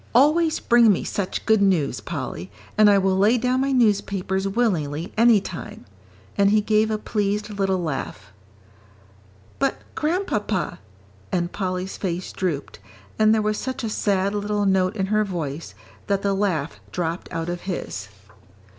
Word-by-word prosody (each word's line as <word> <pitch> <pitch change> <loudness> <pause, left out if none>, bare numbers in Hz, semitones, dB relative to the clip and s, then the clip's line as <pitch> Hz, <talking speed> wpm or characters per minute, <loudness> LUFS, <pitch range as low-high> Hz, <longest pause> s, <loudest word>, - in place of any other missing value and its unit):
Always 315 +5 +4
bring 235 -2 +5
me 190 - 0
such 195 -3 -3
good 220 -2 +4
news, 180 -8 +2
Polly, 90 +3 -5 0.3
and 215 -1 +6
I 200 - +6
will 190 -1 +2
lay 215 +5 +4
down 250 +2 +1
my 275 +1 +1
newspapers 200 -5 +1
willingly 175 -8 -1
any 230 -1 +6
time." 185 -3 -8 0.5
And 200 0 +4
he 215 +1 +4
gave 215 +1 +2
a 215 - 0
pleased 210 0 -2
little 195 -2 0
laugh. 155 - -5 1.3
"But, 275 0 +1 0.2
Grandpapa 300 - -1 0.3
" 100 -1 -29
and 175 -1 0
Polly's 185 -1 -3
face 180 -2 -3
drooped, 165 -7 -3 0.4
and 215 0 +5
there 220 -1 +3
was 215 0 0
such 260 0 -4
a 225 - -1
sad 200 -2 0
little 205 0 -1
note 190 0 +2
in 195 -3 0
her 215 0 +4
voice, 165 -6 -5 0.3
that 200 -1 0
the 200 -1 +1
laugh 180 -7 -1
dropped 170 -1 -3
out 165 0 -3
of 175 0 -4
his. 100 - -4
200 Hz, 155 wpm, -23 LUFS, 180-215 Hz, 1.3 s, and